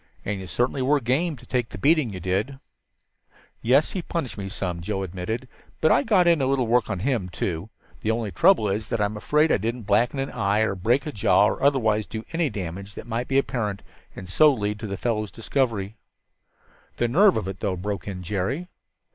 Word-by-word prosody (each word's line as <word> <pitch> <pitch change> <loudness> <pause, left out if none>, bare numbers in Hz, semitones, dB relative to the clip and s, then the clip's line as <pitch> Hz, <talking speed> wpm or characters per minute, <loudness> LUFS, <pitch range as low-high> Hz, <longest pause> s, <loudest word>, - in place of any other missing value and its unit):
"And 100 -1 -2
you 95 - -7
certainly 125 +6 0
were 145 +3 +3
game, 140 +7 0
to - - -16
take 125 -3 -1
the - - -8
beating 145 - +3
you 95 - -6
did." 100 +10 -2 1.0
"Yes, 135 +6 +3
he 185 - -3
punished 165 -6 -4
me 100 -1 -5
some," 90 -4 -3
Joe 95 +3 -2
admitted. 95 +7 -4 0.3
"But 155 - +4
I - - +5
got 205 -9 +3
in 170 -4 +4
a 130 - +2
little 135 -2 +1
work 115 0 +2
on 100 -4 -2
him, 115 -6 0
too. 90 +2 -3 0.3
The 110 - -2
only 110 -2 -1
trouble 165 - +4
is 105 +2 -2
that 115 - -2
I'm 105 0 0
afraid 150 +9 +2
I - - +4
didn't 115 +3 -3
blacken 115 +6 +2
an 135 0 -2
eye, 100 +2 +1
or 110 -2 +1
break 115 +8 +1
a 150 - -3
jaw, 95 -4 +4
or 105 - -1
otherwise 110 -7 +2
do 110 0 -6
any 165 -2 +1
damage 100 -1 -6
that - - -8
might 120 +1 -3
be 135 - +1
apparent 110 -7 -1 0.3
and 95 - -8
so 150 +11 +5
lead 105 -4 -2
to 110 - -5
the 100 -1 -4
fellow's 110 -3 -1
discovery." 115 -3 -2 1.0
"The 120 - +1
nerve 190 - +5
of 105 - -2
it, 95 0 -5
though!" 100 -3 -1
broke 100 -1 -4
in 90 -2 -5
Jerry. 105 - -2
110 Hz, 215 wpm, -24 LUFS, 100-135 Hz, 1.0 s, I